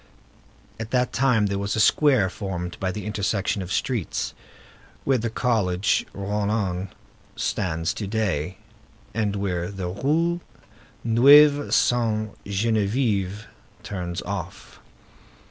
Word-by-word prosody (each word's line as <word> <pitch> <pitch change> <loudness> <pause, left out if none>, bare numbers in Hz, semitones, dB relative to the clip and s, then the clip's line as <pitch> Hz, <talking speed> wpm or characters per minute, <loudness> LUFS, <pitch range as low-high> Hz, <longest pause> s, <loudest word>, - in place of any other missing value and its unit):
At 115 -1 -5
that 125 -1 +1
time 125 -5 +3
there 100 -1 -1
was 100 +1 -2
a - - -1
square 130 -2 +4
formed 90 -2 -5
by 95 -1 -1
the 105 +2 -6
intersection 105 -1 -1
of 90 0 -6
streets, 120 -7 -1 0.7
where 135 -2 +2
the 115 +1 -2
College 105 -5 +1
Rollin 100 -2 -2 0.5
stands 85 -2 -1
to 110 -3 -5
day, 95 -5 -1 0.6
and 105 -2 0
where 90 -3 -2
the 95 -3 -4
Rue 160 - 0 0.6
Neuve 145 +5 +6
Sainte 110 -3 +1
Geneviève 105 -1 0 0.4
turns 90 -3 -4
off. 95 -1 -6
105 Hz, 110 wpm, -24 LUFS, 95-115 Hz, 0.7 s, Neuve